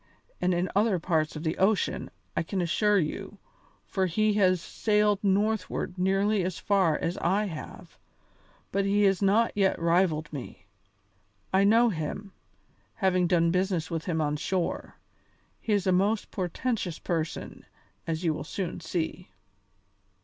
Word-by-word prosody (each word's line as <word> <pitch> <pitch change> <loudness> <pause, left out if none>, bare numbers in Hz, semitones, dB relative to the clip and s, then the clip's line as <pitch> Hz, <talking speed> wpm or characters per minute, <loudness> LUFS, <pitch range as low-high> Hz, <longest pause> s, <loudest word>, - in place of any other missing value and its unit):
and 180 - +2
in 175 +1 +1
other 205 -1 +3
parts 160 -2 0
of 155 - -6
the 160 0 -2
ocean, 195 0 +1 0.3
I - - +1
can 190 +4 -3
assure 205 +4 +2
you, 195 +4 -3 0.5
for 190 -2 0
he 215 +5 +2
has 185 -3 +3
sailed 210 +2 +1
northward 200 -2 0
nearly 195 +3 +2
as 180 -1 -3
far 190 -6 +2
as 170 - -3
I 195 +5 +1
have, 165 -6 -9 0.7
but 200 +1 +1
he 200 +1 +2
has 195 -1 +3
not 210 +4 +3
yet 195 -2 +2
rivalled 165 -2 +1
me. 125 -9 -8 0.9
I 195 +1 +4
know 230 +3 +5
him, 195 +3 -4 0.6
having 185 -4 +2
done 170 -1 +3
business 180 -2 0
with 165 -1 -3
him 160 -3 -1
on 150 0 0
shore. 180 +3 -2 0.6
He 220 - -4
is 200 -2 +1
a 185 - +3
most 200 +4 +1
portentous 185 -1 -2
person, 165 -2 -4 0.4
as 165 +1 -2
you 165 -2 +2
will 150 - -5
soon 175 +3 -4
see." 170 +2 -4
185 Hz, 150 wpm, -28 LUFS, 165-200 Hz, 0.9 s, know